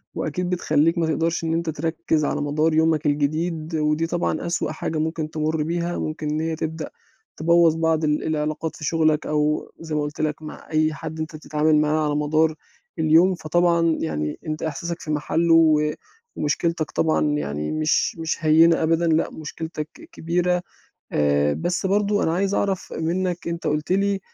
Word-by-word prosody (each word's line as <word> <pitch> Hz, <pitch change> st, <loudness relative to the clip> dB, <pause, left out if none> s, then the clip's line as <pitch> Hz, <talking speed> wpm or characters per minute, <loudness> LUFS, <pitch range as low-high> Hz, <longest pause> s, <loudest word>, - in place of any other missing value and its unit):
وأكيد 175 Hz, +4 st, -2 dB
بتخلّيك 165 Hz, -1 st, +2 dB
ما 165 Hz, -1 st, +1 dB
تقدرش 165 Hz, +2 st, 0 dB
إن 165 Hz, 0 st, 0 dB
أنت 165 Hz, 0 st, -1 dB
تركِّز 160 Hz, 0 st, -1 dB
على 145 Hz, -, -1 dB
مدار 155 Hz, +2 st, +1 dB
يومك 160 Hz, -1 st, +2 dB
الجديد، 155 Hz, +3 st, -1 dB
ودي 150 Hz, +1 st, +1 dB
طبعًا 175 Hz, +1 st, -1 dB
أسوأ 170 Hz, -2 st, -1 dB
حاجة 160 Hz, 0 st, -3 dB
ممكن 160 Hz, 0 st, -2 dB
تمُرّ 155 Hz, 0 st, -1 dB
بيها 170 Hz, +2 st, -2 dB
ممكن 155 Hz, -1 st, -3 dB
إن 155 Hz, +1 st, -1 dB
هي 160 Hz, 0 st, -1 dB
تبدأ 160 Hz, -1 st, -4 dB, 0.5 s
تبوّظ 170 Hz, 0 st, +4 dB
بعض 160 Hz, -1 st, +1 dB
ال 150 Hz, 0 st, +1 dB
العلاقات 155 Hz, 0 st, -2 dB
في 150 Hz, -, -11 dB
شغلك، 155 Hz, -1 st, +2 dB
أو 150 Hz, 0 st, 0 dB
زي 160 Hz, -2 st, -5 dB
ما 150 Hz, -, +1 dB
قُلت 150 Hz, +1 st, -4 dB
لك 155 Hz, 0 st, -1 dB
مع 155 Hz, -, -10 dB
أي 155 Hz, 0 st, +2 dB
حد 155 Hz, +2 st, -7 dB
أنت 155 Hz, 0 st, -4 dB
بتتعامل 155 Hz, 0 st, +1 dB
معاه 155 Hz, 0 st, +1 dB
على 145 Hz, 0 st, 0 dB
مدار 155 Hz, +2 st, +2 dB, 0.5 s
اليوم، 165 Hz, +4 st, +5 dB
فطبعًا 170 Hz, 0 st, +2 dB
يعني 75 Hz, -1 st, -3 dB
أنت 155 Hz, 0 st, -3 dB
إحساسك 165 Hz, +3 st, -3 dB
في 155 Hz, -, -5 dB
محلُّه 165 Hz, +3 st, +1 dB
و 155 Hz, -2 st, +4 dB, 0.4 s
ومشكلتك 160 Hz, +1 st, -1 dB
طبعًا 160 Hz, -1 st, +1 dB
يعني 75 Hz, -, -3 dB
مش 155 Hz, +1 st, +1 dB
مش 160 Hz, -1 st, -2 dB
هيّنة 165 Hz, +1 st, +5 dB
أبدًا، 165 Hz, +1 st, +2 dB
لأ 160 Hz, 0 st, +2 dB
مشكلتك 155 Hz, 0 st, -6 dB, 0.2 s
كبيرة، 180 Hz, -, 0 dB, 0.5 s
آآ، 75 Hz, 0 st, +2 dB
بس 175 Hz, -, -2 dB
برضه 205 Hz, +1 st, +2 dB
أنا 160 Hz, -, +1 dB
عايز 195 Hz, +2 st, 0 dB
أعرف 195 Hz, -2 st, -1 dB
منك 175 Hz, +1 st, -2 dB
أنت 170 Hz, 0 st, -3 dB
قُلت 150 Hz, +3 st, -1 dB
لي 200 Hz, 0 st, +2 dB
160 Hz, 170 wpm, -23 LUFS, 150-170 Hz, 0.5 s, اليوم